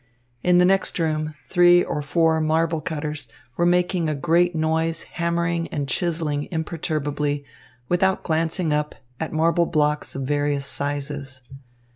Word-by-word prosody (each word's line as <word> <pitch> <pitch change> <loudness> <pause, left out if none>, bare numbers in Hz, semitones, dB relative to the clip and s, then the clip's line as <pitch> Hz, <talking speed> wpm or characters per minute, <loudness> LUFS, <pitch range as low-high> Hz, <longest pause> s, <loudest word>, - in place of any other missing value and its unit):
In 180 0 +4
the 180 - +6
next 195 +1 +2
room, 155 -2 -1
three 175 -1 +5
or 150 - -3
four 160 +2 +2
marble 160 +1 +1
cutters 150 -3 -4 0.3
were 175 - +2
making 180 -1 +2
a 155 - -1
great 170 +4 +2
noise 160 +1 0
hammering 170 0 -1
and 145 -2 -3
chiselling 155 -1 -1
imperturbably, 150 -3 -2 0.4
without 190 +3 +1
glancing 165 0 0
up, 150 0 -1 0.2
at 160 - -3
marble 165 +2 +2
blocks 150 -2 0
of 135 - -3
various 145 0 0
sizes. 140 -2 -3
160 Hz, 135 wpm, -23 LUFS, 150-170 Hz, 0.4 s, the